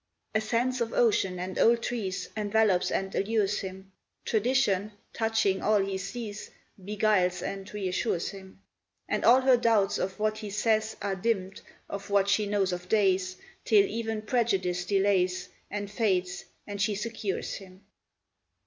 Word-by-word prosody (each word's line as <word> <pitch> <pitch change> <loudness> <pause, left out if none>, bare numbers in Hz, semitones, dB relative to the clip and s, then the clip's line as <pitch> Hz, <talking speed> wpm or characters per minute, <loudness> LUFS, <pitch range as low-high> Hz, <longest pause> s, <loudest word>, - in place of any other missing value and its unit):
A 215 - +2
sense 240 +3 0
of 230 -1 -1
ocean 200 -6 +2
and 185 +1 -4
old 235 0 +4
trees 210 -6 -3
Envelops 210 -3 +2
and 195 0 -2
allures 210 0 +1
him; 190 0 -8 0.3
Tradition, 215 -3 +1 0.2
touching 220 -4 +1
all 215 0 +3
he 195 0 -1
sees, 205 +1 -6 0.3
Beguiles 195 -3 +1
and 195 0 -5
reassures 190 -2 -1
him; 190 -1 -12 0.5
And - - -1
all 250 +3 +7
her 260 -1 +5
doubts 225 -4 +2
of 190 0 -3
what 215 0 0
he 215 -2 -6
says 220 +1 +1
Are 200 -1 -1
dimmed 190 -1 -2 0.3
of 200 0 -7
what 200 0 +3
she 205 +1 +2
knows 200 -2 +1
of 180 0 -6
days 190 -3 +2 0.3
Till 205 -3 +5
even 220 0 -3
prejudice 195 -7 0
delays 190 -2 +1 0.2
And 205 -1 -4
fades, 185 -5 0 0.2
and 200 -1 -5
she 205 +1 +1
secures 210 -2 -3
him. 190 0 -14
205 Hz, 150 wpm, -28 LUFS, 190-220 Hz, 0.5 s, all